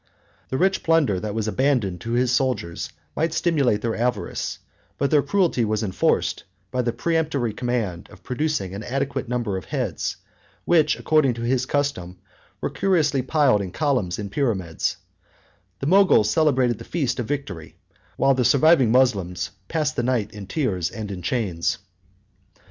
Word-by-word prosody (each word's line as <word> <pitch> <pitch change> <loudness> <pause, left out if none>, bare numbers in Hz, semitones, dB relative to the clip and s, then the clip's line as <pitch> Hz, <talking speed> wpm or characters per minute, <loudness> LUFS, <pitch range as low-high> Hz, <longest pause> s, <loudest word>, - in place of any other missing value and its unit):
The 130 - -1
rich 190 +4 +2
plunder 155 - +2
that 105 +1 -4
was 110 -1 -1
abandoned 110 -8 0
to 115 - -4
his 125 0 +2
soldiers 125 -10 -1 0.3
might 160 +1 0
stimulate 140 -11 +1
their 115 -1 -1
avarice; 120 -2 -2 0.4
but 140 - 0
their 150 -2 +5
cruelty 160 -4 +1
was 110 0 0
enforced 95 -3 0 0.3
by 125 0 0
the 120 -1 0
peremptory 150 -7 -1
command 115 -9 -3
of - - -16
producing 140 -7 -2
an 100 - -5
adequate 135 +1 -3
number 120 -6 -1
of 95 - -7
heads, - - -3 0.5
which, 160 -3 +3
according 150 -6 +2
to 115 - -5
his 125 +1 0
custom, 115 -12 -2 0.4
were - - -2
curiously 155 -8 +2
piled 130 -5 +3
in 95 - -4
columns 125 - 0
and 100 -2 -5
pyramids: 100 - -1 0.8
the - - -2
Moguls 180 - +5
celebrated 130 -7 +2
the - - -8
feast 135 -7 -2
of 120 - -2
victory, 105 - -5 0.4
while 135 0 +4
the 130 -1 +1
surviving 140 -2 +5
Moslems 105 -9 +1 0.2
passed 155 -2 -1
the - - 0
night 120 -4 0
in 100 -2 -9
tears 95 - -1
and 110 -2 -6
in 95 -2 -6
chains. 90 -5 -1
125 Hz, 160 wpm, -23 LUFS, 105-145 Hz, 0.8 s, their